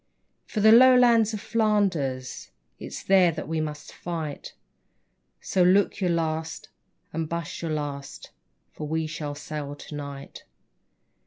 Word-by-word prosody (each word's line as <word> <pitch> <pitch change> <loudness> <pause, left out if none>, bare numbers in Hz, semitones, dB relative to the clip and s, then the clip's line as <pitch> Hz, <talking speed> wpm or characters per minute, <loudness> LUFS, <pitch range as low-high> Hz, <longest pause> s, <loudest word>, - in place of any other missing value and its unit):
For 215 - -2
the 220 +1 +7
Lowlands 240 -2 +6
of 215 - -4
Flanders, 190 - 0 0.3
It's - - -7
there 190 -3 +5
that 155 - -6
we 160 0 -1
must 150 -1 -6
fight; 160 -4 -6 0.9
So 185 - 0
look 185 +3 +4
your 180 - +2
last 160 -1 -2 0.4
and 160 -1 -3
buss 170 +1 -4
your 165 - -3
last, 145 -2 -5 0.4
For 150 - -7
we 160 +1 -1
shall 150 -2 -5
sail 145 -1 -6
to 150 - -10
night. 140 -1 -8
160 Hz, 135 wpm, -26 LUFS, 150-195 Hz, 0.9 s, the